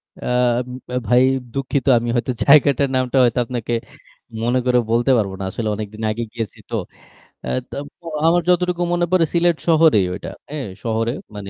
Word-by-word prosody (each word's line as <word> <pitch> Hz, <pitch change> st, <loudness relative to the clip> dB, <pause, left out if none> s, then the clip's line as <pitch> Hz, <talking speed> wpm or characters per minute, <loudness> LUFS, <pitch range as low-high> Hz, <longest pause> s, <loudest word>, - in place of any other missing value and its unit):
অ্যা -, -, -6 dB, 0.7 s
উ -, -, +1 dB
ভাই 125 Hz, +3 st, +5 dB, 0.3 s
দুঃখিত 135 Hz, -1 st, -2 dB
আমি 120 Hz, 0 st, -4 dB
হয়তো 125 Hz, +2 st, 0 dB
জায়গাটার 140 Hz, -1 st, +5 dB
নামটা 130 Hz, +1 st, 0 dB
হয়তো 120 Hz, 0 st, +2 dB
আপনাকে 120 Hz, -1 st, -4 dB, 0.7 s
মনে 125 Hz, +2 st, +2 dB
করে 125 Hz, -1 st, +3 dB
বলতে 120 Hz, +3 st, +2 dB
পারব 100 Hz, -3 st, 0 dB
না। -, -, -4 dB
আসলে 110 Hz, +2 st, -3 dB
অনেকদিন 110 Hz, +1 st, -7 dB
আগে 120 Hz, +2 st, -3 dB
গিয়েছি 115 Hz, -4 st, -5 dB
তো। -, -, -3 dB, 0.7 s
অ্যা্ -, -, -3 dB, 0.5 s
তো 170 Hz, -, -24 dB, 0.2 s
আমার 175 Hz, +1 st, +4 dB
যতটুকু 180 Hz, 0 st, +1 dB
মনে 175 Hz, 0 st, +1 dB
পড়ে 180 Hz, -3 st, +4 dB
সিলেট 170 Hz, -1 st, +2 dB
শহরেই 160 Hz, -, +5 dB
ওইটা। 95 Hz, -, -6 dB, 0.2 s
হ্যাঁ, 145 Hz, -7 st, -4 dB, 0.2 s
শহরে 115 Hz, 0 st, 0 dB, 0.2 s
মানে 100 Hz, -1 st, -7 dB
125 Hz, 165 wpm, -20 LUFS, 115-155 Hz, 0.7 s, ভাই